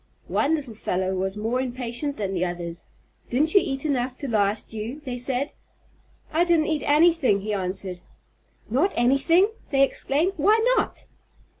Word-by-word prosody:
One 310 +3 +2
little 280 -7 -6
fellow 190 -3 -2
was 190 +2 -2
more 225 +4 -1
impatient 255 +2 -3
than 195 -2 -2
the 180 -1 0
others. 175 -1 -5 0.4
"Didn't 295 +6 +2
you 395 - +7
eat 270 +1 -1
enough 255 -3 -1
to 280 - -5
last 210 -2 0
you?" 225 +6 -5
they 250 -4 -5
said. 260 +3 -2 0.8
"I 330 +2 +4
didn't 340 -3 +3
eat 310 -3 -1
anything," 300 - +4
he 210 +1 -3
answered. 185 -1 -3 0.7
"Not 300 - +1
anything!" 275 - +3 0.2
they 275 -1 +4
exclaimed. 295 +6 +1
"Why 410 +9 +4 0.2
not?" - - -2
255 Hz, 155 wpm, -24 LUFS, 210-300 Hz, 0.8 s, you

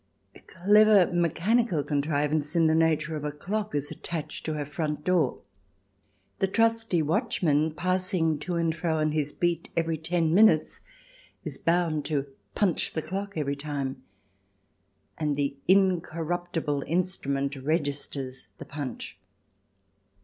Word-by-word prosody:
A - - -14
clever 205 0 +4
mechanical 175 +2 +1
contrivance 150 +1 0
in 165 -1 +4
the 160 - +4
nature 160 0 +2
of 150 - -5
a 150 - -2
clock 205 +6 -3
is 145 0 -1
attached 165 -4 -5
to 155 - -1
her 150 -1 -3
front 150 0 -3
door. 170 -7 +1 1.0
The 195 - +2
trusty 225 -4 +2
watchman, 160 - +1
passing 185 -3 0
to 175 +4 -3
and 165 -1 0
fro 165 -1 -1
on 155 0 +1
his 150 -1 -1
beat 170 0 -1
every 165 -1 0
ten 165 0 0
minutes, 185 -6 +4 0.6
is - - -5
bound 165 -3 +1
to 145 -3 -1 0.3
punch 195 -5 +1
the 160 - -2
clock 195 +4 -4
every 140 -3 -1
time, 140 -2 -4 1.2
and 150 -2 0
the 140 -1 -1
incorruptible 175 -4 +1
instrument 145 -5 -1
registers 140 -2 -3
the - - -9
punch. 145 -5 -6
160 Hz, 130 wpm, -27 LUFS, 145-180 Hz, 1.2 s, clever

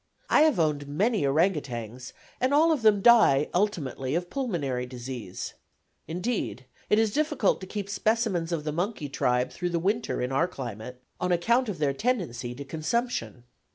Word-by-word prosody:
I - - +6
have 310 - +4
owned 150 -3 0
many 205 +9 +1
ourang 165 +7 +3
outangs, 125 -3 -6 0.3
and 260 +3 +2
all 320 +3 +5
of 305 -6 +1
them 210 -3 +4
die 220 - +6
ultimately 155 - -1
of 175 +1 -2
pulmonary 145 - -2
disease; 120 -6 -6 0.5
indeed, 165 - -3 0.2
it 210 - +4
is 220 -2 +2
difficult 295 -11 +1
to 185 - -7
keep 205 0 -4
specimens 200 -5 0
of 165 -3 -1
the 150 - -2
monkey 170 -2 -3
tribe 125 -2 0
through 180 -1 -3
the 170 - -1
winter 205 +7 -1
in 125 +1 -2
our 140 +6 +2
climate, 125 - -7 0.2
on 180 - -1
account 235 +8 +2
of 195 - -4
their 145 -2 +1
tendency 135 - -2
to 140 +2 -8
consumption. 160 - -2
170 Hz, 170 wpm, -27 LUFS, 135-215 Hz, 0.5 s, I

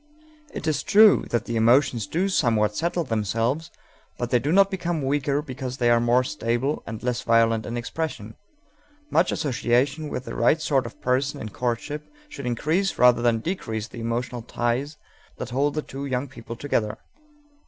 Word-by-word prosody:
It - - -6
is 155 -2 0
true 215 0 +6
that 120 -1 0
the 115 - -3
emotions 120 0 +3
do 180 +4 0
somewhat 110 - +2
settle 170 +4 0
themselves, 115 - -1 0.5
but 120 0 -3
they 125 - +4
do 145 +6 -1
not 195 +2 +5
become 175 -5 -2
weaker 145 +1 0
because 130 -2 -6
they 120 -2 +3
are 120 - +5
more 120 +2 +3
stable 120 +6 -1
and 110 0 -6
less 125 -1 -1
violent 115 -1 +2
in 120 +2 -3
expression. 120 -4 -4 0.8
Much 170 +3 +3
association 135 +1 0
with 130 - -5
the - - -6
right 160 - +3
sort 135 -5 +1
of - - -13
person 130 +3 0
in 110 - -6
courtship 125 +7 -3 0.2
should 140 - -7
increase 160 +11 0
rather 125 -1 +5
than 115 -2 +2
decrease 110 - -4
the 120 - -8
emotional 120 +1 -3
ties 120 +6 -2 0.4
that 125 - -6
hold 140 +4 +1
the 155 - -1
two 140 +1 -6
young 130 +1 -2
people 115 -2 -9
together. 115 -5 -1
125 Hz, 175 wpm, -24 LUFS, 115-150 Hz, 0.8 s, true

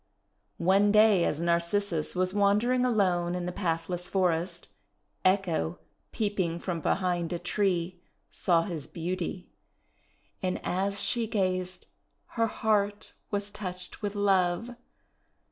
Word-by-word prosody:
One 195 +4 +4
day 210 -4 +5
as 150 - -1
Narcissus 170 0 0
was 185 +1 +1
wandering 210 +5 +3
alone 180 -7 +2
in 180 -1 -3
the 180 - -2
pathless 175 -1 -2
forest, 180 -2 0 0.5
Echo, 185 -3 +1 0.3
peeping 200 -6 -1
from 170 -1 -3
behind 175 -1 0
a 175 - -1
tree, 180 -1 -1 0.3
saw 170 -2 +2
his 165 -7 -5
beauty; 180 +1 -4 0.9
and 185 -1 -1
as 200 +2 0
she 235 -2 0
gazed 185 -3 -1 0.4
her 230 -1 +1
heart 205 -1 0 0.2
was 205 0 -2
touched 185 -3 -6
with 205 -1 -3
love. 195 +2 +2
185 Hz, 115 wpm, -28 LUFS, 175-205 Hz, 0.9 s, day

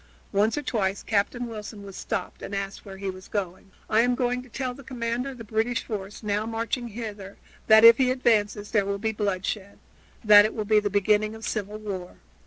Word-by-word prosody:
Once 210 +6 +2
or 295 - -2
twice 200 -6 -1
Captain 220 +4 0
Wilson 215 -2 -8
was 195 -1 -10
stopped 200 -5 -4
and 200 - -5
asked 195 0 -4
where 195 -1 -10
he 195 0 -3
was 185 0 -12
going. 190 -2 -4 0.2
"I 220 +1 +4
am 245 +1 +2
going 245 0 0
to 255 - -15
tell 255 +1 -3
the 275 - -12
commander 245 0 -3
of 265 - -9
the 230 - -8
British 225 +2 -1
force, 210 0 -6
now 210 +1 -1
marching 230 +2 -2
hither, 210 -3 -7 0.3
that 220 0 +7
if 230 0 +10
he 255 -1 +4
advances 215 -5 +1
there 205 -3 +2
will 200 0 -1
be 220 +2 -1
bloodshed 200 -1 -3 0.5
that 210 -1 +9
it 215 - -2
will 215 - -2
be 215 0 +4
the 205 -1 -1
beginning 210 +2 +2
of 220 0 -8
civil 210 -1 -3
war. 195 -4 -6
215 Hz, 210 wpm, -26 LUFS, 200-230 Hz, 0.5 s, if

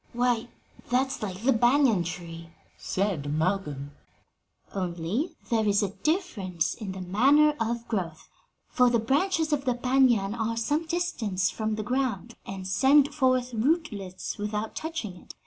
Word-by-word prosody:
'" - - -33
"Why, 240 -1 +1 0.4
that's 265 +3 0
like 195 -1 -5
the 270 +2 +4
banyan 240 -4 +4
tree," 170 -1 -7 0.3
said 185 -8 -2
Malcolm. 155 -4 -1 0.8
"Only 190 - -2 0.2
there 220 -2 +2
is 205 0 +3
a 195 - -1
difference 210 - -1
in 205 -5 -6
the 190 - -7
manner 275 +12 +4
of 235 +1 -2
growth, 175 -7 -3 0.4
for 250 -1 +3
the 240 - +3
branches 305 - +1
of 280 -1 -1
the 250 -2 +1
banyan 245 -5 +3
are 225 0 -2
some 295 +8 0
distance 225 - -1
from 220 -1 -2
the 215 - -3
ground 235 -2 -1
and 190 -1 -6
send 275 +9 +4
forth 255 -3 +1
rootlets 220 - -1
without 210 +1 -3
touching 315 - -4
it. - - -13
225 Hz, 145 wpm, -27 LUFS, 190-265 Hz, 0.8 s, the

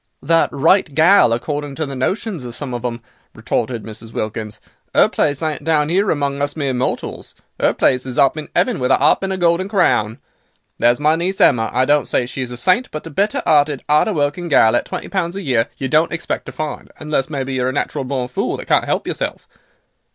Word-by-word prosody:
"That 165 0 +2
'right 165 +4 +3
gal,' 165 - +5
according 145 +4 -3
to 155 - -2
the 140 -1 -6
notions 185 - -2
of 120 -1 -7
some 135 -3 -5
of 120 - -4
'em," 120 -1 -3 0.3
retorted 120 -4 -2
Mrs. 110 +1 -8
Wilkins, 110 -1 -4 0.4
"'er - - +7
place 145 0 -1
ain't 155 -1 -2
down 155 -1 +1
'ere 195 +3 +2
among 140 -2 -1
us 145 0 -1
mere 140 -4 -1
mortals; 125 +1 -3 0.3
'er - - +4
place 130 0 +1
is 125 - -5
up 135 +1 +4
in 155 -1 -7
'eaven 245 -7 +1
with 125 - 0
a - - +5
'arp - - +3
and 195 0 -2
a 190 - -2
golden 175 +2 +1
crown. 115 - +1 0.6
There's 120 +2 +3
my 155 +2 +3
niece, 180 +4 -2
Emma, 115 -4 +4
I 130 +1 +2
don't 145 0 +2
say 125 - 0
she 130 +2 -6
is 125 - -3
a 125 - -7
saint, 185 - +2
but 155 - -7
a 165 - -8
better 200 +8 0
'earted, 145 -3 +2
'arder 150 +8 +3
working 150 +3 -1
gal, 120 -7 +4
at - - 0
twenty - - -6
pounds 180 -2 -2
a 200 - -5
year, 120 -5 +1
you 135 - -3
don't 155 +5 +2
expect 165 - -4
to - - -6
find, 155 -1 -6
unless 150 -3 -2
maybe 135 -3 -3
you're 130 -1 0
a - - -1
natural 140 0 -2
born 130 -1 -3
fool 125 - -2
that - - -8
can't - - +2
'elp - - -1
yourself. - - -4
145 Hz, 225 wpm, -18 LUFS, 125-165 Hz, 0.6 s, er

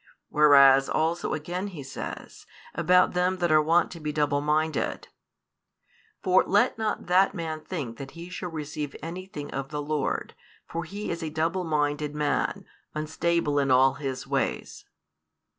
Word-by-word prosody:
Wherefore 140 -2 +6
also 165 +2 0
again 175 +6 -4
he 170 -8 -8
says, 135 - -8 0.3
about 180 0 +3
them 180 +1 +1
that 175 -2 0
are 155 0 +6
wont 165 +2 +2
to 170 - -8
be 150 -1 -3
double 145 -1 +1
minded: 155 0 -1 1.1
For 185 0 +4
let 205 - +2
not 220 -1 -2
that 185 +3 +3
man 160 -3 -4
think 145 -9 -5
that 135 -1 -7
he 170 +1 -8
shall 180 0 -5
receive 150 -2 -5
anything 165 -3 -7
of 135 0 -4
the 150 - -4
Lord; 145 -1 -2 0.3
for 170 +1 -4
[he 200 +5 -5
is] 170 0 -4
a 160 - -3
double 165 +4 -1
minded 150 -1 -1
man, 150 -1 -1 0.3
unstable 155 -1 0
in 140 -1 +1
all 130 +1 +5
his 135 -2 -5
ways. - - -2
155 Hz, 155 wpm, -27 LUFS, 145-175 Hz, 1.1 s, Wherefore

